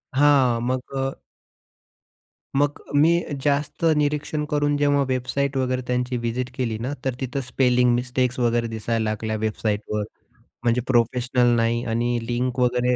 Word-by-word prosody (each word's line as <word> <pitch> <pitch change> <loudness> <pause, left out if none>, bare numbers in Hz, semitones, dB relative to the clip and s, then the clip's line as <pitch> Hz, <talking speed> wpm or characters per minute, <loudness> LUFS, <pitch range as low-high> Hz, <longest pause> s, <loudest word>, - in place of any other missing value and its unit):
हां, 135 -4 +4
मग 125 +1 -1 0.2
अ 135 0 0 1.5
मग 145 0 +1 0.2
मी 150 +3 +5 0.3
जास्त 145 +3 0
निरीक्षण 150 +1 0
करून 145 0 +2
जेव्हा 145 -1 +3
वेबसाईट 130 +2 -1
वगैरे 130 -1 0
त्यांची 125 0 -1
व्हिजीट 120 +2 -2
केली 115 -4 -2
ना, 130 +5 -3
तर 130 - +1
तिथं 130 +2 -2
स्पेलिंग 125 -1 +2
मिस्टेक्स 125 +1 -1
वगैरे 120 -1 +1
दिसायला 115 0 -2
लागल्या 110 +1 -2
वेबसाईटवर 105 -1 -2 0.6
म्हणजे 120 +1 +2
प्रोफेशनल 120 0 +2
नाही 115 +1 +1
आणि 120 +1 0
लिंक 125 +1 -1
वगैरे 125 0 +2
125 Hz, 135 wpm, -23 LUFS, 120-135 Hz, 1.5 s, मी